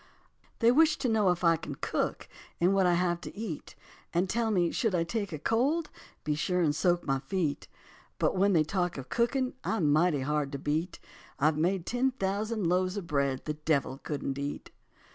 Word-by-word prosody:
They 230 +1 +6
wish 310 +3 +4
to 255 - -1
know 215 -4 +3
if 180 0 0
I 165 -1 +5
can 155 -3 -7
cook - - -2 0.3
And 180 +3 +3
what 195 -2 +3
I 175 - +4
have 175 -1 0
to - - -9
eat, 205 -9 -6 0.4
And 180 +3 +2
tell 230 +3 0
me 180 -5 +2
should 225 -6 0
I 170 - +2
take 200 +3 -3
a 155 - -4
cold 275 - 0 0.3
Be 150 - 0
sure 180 +4 0
and 155 -4 +2
soak 175 +2 +1
my 135 -1 +1
feet. 150 +1 -2 0.5
But - - +1
when 200 +2 +3
they 160 -3 +4
talk 175 0 -1
of 130 -1 -7
cooking 255 +2 0
I'm 160 -10 +1
mighty 155 -2 +3
hard 145 0 -1
to - - -2
beat, 155 +5 -2 0.4
I've 150 +3 +3
made 180 +2 +1
ten 250 +2 +1
thousand 210 -1 -2
loaves 185 +3 +1
of 200 - -4
bread 140 -4 -1
The 150 - -1
devil 150 -3 -1
couldn't 140 -2 -4
eat. 140 +1 -5
175 Hz, 200 wpm, -29 LUFS, 150-205 Hz, 0.5 s, They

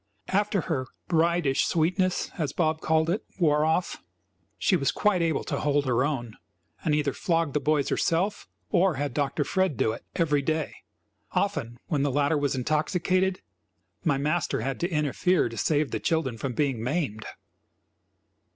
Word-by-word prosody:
After 200 0 +1
her 130 -6 -2 0.2
"bridish 165 -4 +2
sweetness" 180 +2 +1
as 150 -5 -2
Bob 155 -2 0
called 160 0 +2
it 180 +6 0
wore 150 -4 +3
off, 160 +3 0 0.6
she - - +2
was - - +1
quite 205 -4 +2
able 165 -3 +1
to - - -3
hold 145 -1 +1
her 125 -1 +2
own, 120 -6 -3 0.5
and 150 - +2
either 145 -2 0
flogged 165 -4 0
the 150 - +2
boys 145 0 +1
herself, 190 +5 0 0.2
or 180 -2 +3
had 140 -1 -2
Dr. 145 +1 0
Fred 185 - 0
do 110 - +2
it, 115 - -7
every 150 -4 +2
day. 155 +1 -1 0.6
Often, 120 +1 -1
when 150 -4 0
the 145 - +2
latter 145 +3 +2
was 145 -1 0
intoxicated, 180 +7 0 0.6
my 145 -5 +2
master 150 -1 0
had 135 +3 -3
to 175 - 0
interfere 155 +2 +1
to 115 - -8
save 150 +4 +1
the - - -1
children 160 -7 0
from 125 +3 -4
being 135 -4 0
maimed. 125 -6 -2
155 Hz, 160 wpm, -27 LUFS, 140-170 Hz, 0.6 s, wore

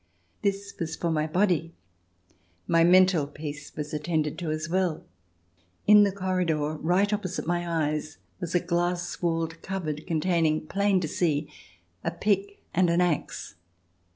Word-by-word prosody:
This 200 0 -1
was 160 -2 -3
for 170 - -1
the 155 0 0
body; 170 -1 +1 0.9
my 165 0 +4
mental 180 -3 +5
peace 145 -1 -7
was 150 0 -5
attended 150 0 -1
to 170 -3 -3
as 155 0 -2
well. 180 -2 0 0.8
In 210 0 +8
the 200 -1 +4
corridor, 180 -6 0
right 185 +7 +2
opposite 190 -3 -2
my 175 +1 -1 0.2
eyes, 150 0 -4 0.2
was 175 -2 -4
a - - +5
glass 175 0 -1
walled 165 -1 -1
cupboard, 160 -6 -4
containing, 160 -2 +1
plain 200 +2 +2
to 160 - -1
see, 150 -2 0 0.5
a - - 0
pick 200 +3 -1
and 180 0 +3
an 170 +1 +2
axe. 175 -4 -1
170 Hz, 145 wpm, -27 LUFS, 155-185 Hz, 0.9 s, In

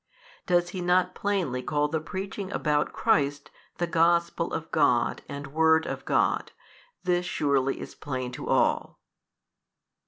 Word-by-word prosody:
Does 175 -1 +2
he 185 - -5
not 180 +1 +2
plainly 185 -13 -1
call 150 +1 0
the 160 +1 -1
preaching 190 +4 -5
about 150 -4 0
Christ 145 -9 +1 0.3
the 175 - 0
Gospel 170 0 +2
of 160 - -4
God 125 -7 +2
and 140 0 -7
word 160 0 +4
of - - -5
God? - - +1 0.5
this 180 -1 +1
surely 140 -4 +1
is - - -8
plain 130 -4 -4
to - - -7
all. - - +1
160 Hz, 135 wpm, -27 LUFS, 145-175 Hz, 0.5 s, word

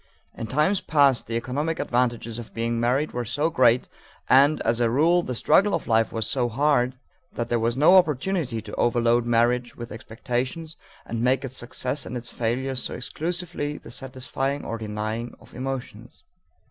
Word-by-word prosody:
In 115 - -6
times 150 - +2
past 140 -5 +3
the 115 - -3
economic 145 +7 -2
advantages 120 -2 -1
of 115 - -9
being 115 0 -1
married 130 +6 +1
were 120 - -3
so 145 +8 0
great 125 -3 +4 0.4
and, 140 +4 +5
as 115 +1 +1
a 120 -1 +3
rule, 165 +8 +3
the 125 -7 -4
struggle 200 - +3
of - - -4
life 115 -1 +2
was 110 -2 -2
so 120 +1 0
hard, 130 0 +2 0.4
that 120 0 -3
there 120 - +1
was 115 +2 0
no 155 +7 +6
opportunity 155 - +1
to 105 - -10
overload 120 0 +2
marriage 120 +1 +2
with 120 -1 -8
expectations 125 +8 -4 0.3
and 115 -1 -3
make 130 +3 +2
its 130 0 -7
successes 130 +3 -3
and 125 - -4
its 120 0 -4
failures 125 +3 -1
so - - -4
exclusively 160 +1 -4
the - - -12
satisfying 135 +2 -4
or 115 - -4
denying 110 +2 -4
of - - -17
emotions. 130 0 -6
125 Hz, 170 wpm, -25 LUFS, 115-140 Hz, 0.4 s, no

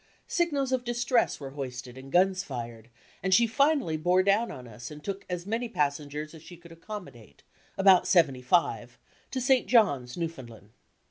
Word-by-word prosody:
Signals 290 -7 0
of 255 -1 0
dis 240 0 -2
tress 240 -1 +2
were 135 -2 -7
hoisted 125 -3 -7
and 135 +1 -11
guns 185 +2 +3
fired, 120 - -7 0.3
and 190 0 +3
she 235 - +5
finally 275 - +1
bore 180 +4 +3
down 200 +4 +2
on 125 -3 -9
us 115 +1 -9
and 150 -1 -11
took 195 -1 -5
as 180 -1 -4
many 230 +3 -2
passengers 150 -2 -2
as 160 - -12
she 175 +2 -12
could 170 0 -16
accommodate 165 - -10 0.3
(about 190 -2 +5
seventy 140 -8 +3
five) 165 +7 0 0.3
to 265 - -3
St. 260 0 +2
John's, 145 - +2
New 170 - 0
SKETCHES 165 - -5
OF - - -19
TRAVEL 115 -1 -12
foundland. 105 +1 -22
175 Hz, 195 wpm, -28 LUFS, 135-225 Hz, 0.3 s, she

